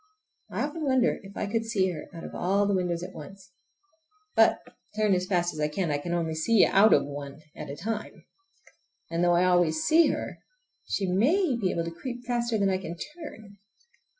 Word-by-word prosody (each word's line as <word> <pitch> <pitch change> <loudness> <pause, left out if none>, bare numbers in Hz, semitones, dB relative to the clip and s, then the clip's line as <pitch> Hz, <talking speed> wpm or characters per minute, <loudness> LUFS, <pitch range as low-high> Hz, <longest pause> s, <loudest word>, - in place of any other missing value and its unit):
I - - -2
often 300 +2 -4
wonder 260 -3 +2
if 195 0 -12
I - - -1
could 225 +2 -1
see 200 -5 0
her 155 -3 -8
out 165 -3 -9
of - - -8
all 195 +3 +1
the 200 - +1
windows 180 -2 -1
at - - -7
once. 190 +4 -11 0.8
But, - - +5 0.4
turn 215 -2 +2
as 185 0 0
fast 175 -2 +1
as 155 - -8
I 150 - +2
can, 165 +1 -2
I 145 - 0
can 170 +4 -5
only 165 -2 -1
see 195 +7 +4
out 210 +3 +5
of - - +5
one 145 +1 -8
at - - -7
one 140 - -7
time. 215 +5 -5 0.9
And 165 +1 0
though 175 0 +4
I 175 +1 +3
always 175 -3 +2
see 330 +1 +5
her - - -3 0.5
she 200 - -1
may 260 - +2
be 205 -6 0
able 170 - -1
to 165 - -4
creep 245 +8 -7
faster 235 -2 0
than 200 -2 +2
I 185 - 0
can 175 -2 -7
turn! 225 - -10
190 Hz, 205 wpm, -27 LUFS, 170-225 Hz, 0.9 s, But